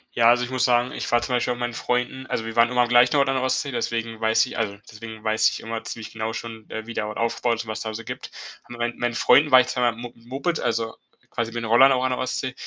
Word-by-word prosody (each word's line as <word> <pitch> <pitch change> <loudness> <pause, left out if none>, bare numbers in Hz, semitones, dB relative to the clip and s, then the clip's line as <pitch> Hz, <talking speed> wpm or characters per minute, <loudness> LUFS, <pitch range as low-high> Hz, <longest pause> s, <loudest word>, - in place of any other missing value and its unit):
Ja, 115 0 +5
also 120 +1 +4
ich 125 - -10
muss 130 -1 0
sagen, 125 0 +2
ich - - -5
war 120 - +3
zum 130 - -3
Beispiel 125 0 +1
auch - - -7
mit 120 - -9
meinen 120 -1 -2
Freunden, 125 +2 -2
also 110 - -3
wir 115 0 -6
waren 115 0 +5
immer 125 0 +2
am 120 - -1
gleichen 120 +2 +5
Ort 140 -1 +3
an 135 - +1
der 130 - 0
Ostsee, 135 +2 0
deswegen 115 -2 -3
weiß 110 0 +3
ich 125 - -6
also 100 -3 -2
deswegen 110 0 -10
weiß 110 0 +3
ich - - -6
immer 115 0 -5
ziemlich 110 -2 -7
genau 110 0 -3
schon, 115 -2 -8
äh, 110 0 -6
wie 115 - -7
der 105 - -2
Ort 105 - -6
aufbaut, 115 0 -1
was 110 0 -5
da 110 - -4
so 115 - -6
gibt. - - -7 0.4
Mein 120 0 -3
meinen 120 -1 -1
Freunden 145 +5 +5
war 130 -1 +8
ich 125 - -3
zweimal 120 -2 0
Mo 120 +1 -8
Moped, 135 +8 -3
also 115 0 -2 0.4
quasi 115 -1 -3
bin 120 0 -4
in 115 - -4
Holland 135 +3 +7
auch 125 - -1
an 130 - +1
der 125 - -2
Ostsee 130 0 -3
120 Hz, 285 wpm, -23 LUFS, 115-125 Hz, 0.4 s, war